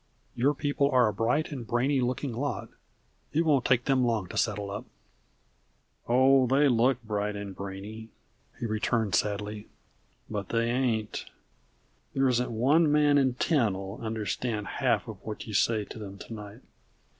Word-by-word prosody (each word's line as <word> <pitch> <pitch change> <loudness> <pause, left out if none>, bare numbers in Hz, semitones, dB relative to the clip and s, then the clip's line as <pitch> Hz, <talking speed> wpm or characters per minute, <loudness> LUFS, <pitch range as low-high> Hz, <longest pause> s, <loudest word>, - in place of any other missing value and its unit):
Your 140 +5 +2
people 145 0 +1
are 125 -4 +4
a 105 - -1
bright 120 +10 0
and 125 -6 -6
brainy 130 +4 +1
looking 125 +1 -1
lot. 130 +2 -3 0.6
It 165 +3 +2
won't 140 -5 +3
take 125 -1 +3
them 135 -2 +3
long 115 -5 +1
to - - -8
settle 105 -3 0
up." 105 +5 -5 1.2
"Oh, 130 +1 +5
they 140 +3 +4
look 125 0 +2
bright 105 -1 -2
and 100 -2 -6
brainy," 100 +4 -7 0.5
he - - -3
returned 110 -1 0
sadly; 105 0 -1 0.6
"but 105 -3 -4
they 115 0 +1
ain't! 120 -4 -1 0.9
There 135 0 +3
isn't 125 -1 +1
one 145 +8 +3
man 145 -1 +4
in 130 -2 +2
ten 125 - +2
'll 95 +2 -7
understand 110 0 -2
a - - -7
half - - 0
of - - -7
what - - -6
you - - -7
say 110 -3 +2
to - - -10
them 100 -2 -8
to 115 - -9
night." 105 +2 -9
115 Hz, 165 wpm, -28 LUFS, 105-135 Hz, 1.2 s, Oh